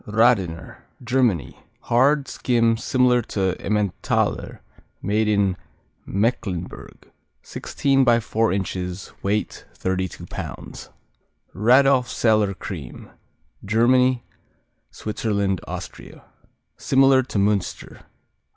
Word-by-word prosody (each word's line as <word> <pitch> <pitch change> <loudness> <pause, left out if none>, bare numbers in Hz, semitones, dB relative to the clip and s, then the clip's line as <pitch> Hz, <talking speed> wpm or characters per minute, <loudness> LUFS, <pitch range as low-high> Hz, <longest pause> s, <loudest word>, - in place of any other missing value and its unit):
Radener 105 -7 +1 0.3
Germany 120 - 0 0.2
Hard; 135 +4 +2
skim, 115 -3 +1
similar 125 +1 +2
to 95 -4 -1
Emmentaler; 105 -2 -1 0.4
made 105 +2 0
in 100 -3 +2 0.5
Mecklenburg. 100 -4 -3 0.3
Sixteen 135 -1 0
by 120 -2 +4
four 115 -1 0
inches, 90 -1 -4
weight 105 +2 -2
32 95 -1 -3
pounds. - - -8 0.6
Radolfzeller 120 -4 +3
Cream 80 - -8 0.5
Germany, 125 +3 +3 0.7
Switzerland, 100 -3 -2
Austria - - -8 0.5
Similar 135 0 +4
to 125 -4 -5
Münster. 100 -2 -1
110 Hz, 80 wpm, -22 LUFS, 95-125 Hz, 0.7 s, by